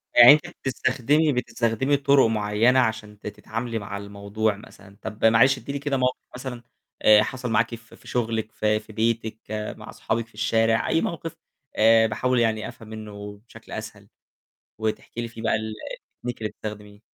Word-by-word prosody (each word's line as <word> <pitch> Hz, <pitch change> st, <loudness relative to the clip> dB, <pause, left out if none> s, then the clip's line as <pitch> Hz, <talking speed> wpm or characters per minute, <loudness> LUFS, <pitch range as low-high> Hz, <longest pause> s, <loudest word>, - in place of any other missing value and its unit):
يعني 120 Hz, +2 st, +11 dB
أنتِ 155 Hz, +4 st, 0 dB
بتستخدمي 140 Hz, 0 st, +1 dB
بتستخدمي 125 Hz, +2 st, 0 dB
طُرق 140 Hz, -1 st, +4 dB
معيّنة 110 Hz, +4 st, +3 dB
عشان 110 Hz, -4 st, -1 dB
ت -, -, -8 dB
تتعاملي 115 Hz, +3 st, -4 dB
مع 100 Hz, -1 st, -6 dB
الموضوع 100 Hz, +1 st, -2 dB
مثلًا. 100 Hz, -1 st, -15 dB
طب 110 Hz, 0 st, -3 dB
معلش 115 Hz, +5 st, +6 dB
ادّي 140 Hz, -, -7 dB
لي 140 Hz, -, -3 dB
كده 140 Hz, -1 st, -1 dB
موقِف 125 Hz, 0 st, +1 dB, 0.2 s
مثلًا 125 Hz, -2 st, -6 dB, 0.4 s
آآ، 105 Hz, 0 st, +7 dB
حصل 125 Hz, -1 st, -4 dB
معاكِ 115 Hz, +2 st, +2 dB
في 115 Hz, 0 st, -16 dB
في -, -, -19 dB
شغلِك 115 Hz, -2 st, -1 dB
في 105 Hz, 0 st, +1 dB
في 110 Hz, 0 st, -14 dB
بيتِك 110 Hz, 0 st, 0 dB, 0.4 s
مع -, -, -10 dB
صحابِك 115 Hz, 0 st, -2 dB
في -, -, -27 dB
الشارع 115 Hz, +1 st, +2 dB
أي 165 Hz, -, +2 dB
موقِف 165 Hz, -1 st, -4 dB, 0.4 s
آآ، 115 Hz, +1 st, +6 dB
باحاول 125 Hz, +3 st, 0 dB
يعني 110 Hz, -2 st, +1 dB
أفهم 110 Hz, -, -11 dB
منه 105 Hz, -2 st, -8 dB
بشكل -, -, -15 dB
أسهل، -, -, -7 dB, 0.7 s
وتحكي 110 Hz, +1 st, -3 dB
لي 115 Hz, -, -4 dB
فيه 115 Hz, 0 st, -10 dB
بقى 110 Hz, -, +2 dB
ال 110 Hz, 0 st, -2 dB, 0.6 s
الtechnique 120 Hz, -, -6 dB
اللي 110 Hz, -, -1 dB
بتستخدميه 105 Hz, -1 st, -9 dB
115 Hz, 170 wpm, -24 LUFS, 105-125 Hz, 0.7 s, يعني